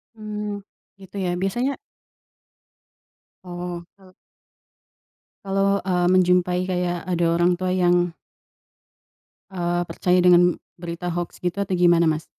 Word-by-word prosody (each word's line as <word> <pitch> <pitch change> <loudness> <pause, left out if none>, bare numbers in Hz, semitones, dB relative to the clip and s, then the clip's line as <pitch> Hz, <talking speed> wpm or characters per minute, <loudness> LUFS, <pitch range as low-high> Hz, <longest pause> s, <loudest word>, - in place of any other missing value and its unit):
Mmm, 210 -1 -5 0.4
gitu 190 +1 -14
ya? 175 - 0
Biasanya 240 +8 0 1.7
Oh, 175 -1 -6 0.2
kalau 185 -1 -19 1.3
kalau, 195 0 +1
eee, 180 -2 +1
menjumpai 180 0 +3
kayak 180 -1 -2
ada 175 -2 0
orang 175 +1 +2
tua 185 - -2
yang 175 -1 +2 1.4
eee, 175 -1 -1
percaya 180 0 +1
dengan 175 -1 +5 0.2
berita 175 0 -5
hoax 175 0 -5
gitu 180 +3 -2
atau 195 -2 -1
gimana, 175 -1 +4
Mas? 155 0 -1
180 Hz, 110 wpm, -23 LUFS, 175-190 Hz, 1.7 s, dengan